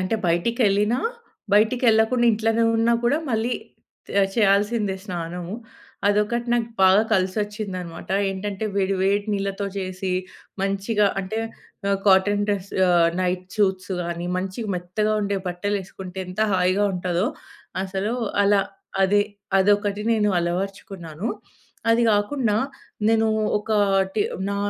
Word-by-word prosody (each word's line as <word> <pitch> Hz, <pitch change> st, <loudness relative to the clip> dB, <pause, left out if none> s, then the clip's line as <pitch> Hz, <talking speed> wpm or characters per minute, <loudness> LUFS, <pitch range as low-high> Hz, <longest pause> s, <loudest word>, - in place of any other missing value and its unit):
అంటే 185 Hz, +4 st, 0 dB
బయటికేళ్ళినా, 210 Hz, +5 st, +2 dB, 0.6 s
బయటికేళ్ళకుండా 225 Hz, +2 st, +3 dB
ఇంట్లోనే 225 Hz, +1 st, +1 dB
ఉన్నా 230 Hz, +1 st, +3 dB
కూడా 280 Hz, +6 st, +3 dB
మళ్ళీ 225 Hz, +2 st, 0 dB, 0.6 s
తే 200 Hz, -, +2 dB, 0.2 s
చేయాల్సిందే 205 Hz, -1 st, +2 dB
స్నానము. 175 Hz, -1 st, -5 dB, 0.5 s
అదొకటి 210 Hz, +4 st, +1 dB
నాకు 235 Hz, -1 st, 0 dB
బాగా 190 Hz, +3 st, +6 dB
కలిసొచ్చిందనమాట. 190 Hz, -2 st, -2 dB, 0.2 s
ఏంటంటే, 195 Hz, +2 st, -4 dB
వేడి 195 Hz, 0 st, +1 dB
వేడి 200 Hz, +1 st, +2 dB
నీళ్లతో 200 Hz, 0 st, -2 dB
చేసి, 185 Hz, 0 st, -3 dB, 0.5 s
మంచిగా 200 Hz, +2 st, +1 dB
అంటే 195 Hz, +4 st, -4 dB, 0.5 s
ఆహ్, 200 Hz, -, +2 dB
కాటన్ 205 Hz, +2 st, +4 dB
డ్రెస్ 200 Hz, -1 st, -2 dB, 0.2 s
ఆహ్, 170 Hz, -1 st, +4 dB
నైట్ 180 Hz, 0 st, -1 dB
చూట్సు 190 Hz, -2 st, +1 dB
గానీ 170 Hz, 0 st, -4 dB
మంచిగ 190 Hz, +5 st, -3 dB
మెత్తగా 185 Hz, +5 st, -1 dB
ఉండే 200 Hz, 0 st, -1 dB
బట్టలేసుకుంటే, 190 Hz, 0 st, -4 dB
ఎంత 180 Hz, +3 st, -5 dB
హాయిగా 185 Hz, +2 st, +2 dB
ఉంటాదొ 180 Hz, +1 st, 0 dB, 0.6 s
అసలు. 195 Hz, +3 st, -2 dB, 0.3 s
అలా 200 Hz, 0 st, +4 dB, 0.4 s
అది, 205 Hz, +2 st, +4 dB, 0.4 s
అదొకటి 205 Hz, +1 st, +2 dB
నేను 210 Hz, -2 st, +2 dB
అలవర్చుకున్నాను. 175 Hz, 0 st, -4 dB, 0.6 s
అది 230 Hz, +1 st, +4 dB
గాకుండా 210 Hz, +2 st, +1 dB, 0.5 s
నేనూ 225 Hz, 0 st, +3 dB, 0.3 s
ఒకాటి 205 Hz, -1 st, +1 dB, 0.3 s
నా 200 Hz, -, -2 dB
200 Hz, 110 wpm, -23 LUFS, 185-215 Hz, 0.6 s, బాగా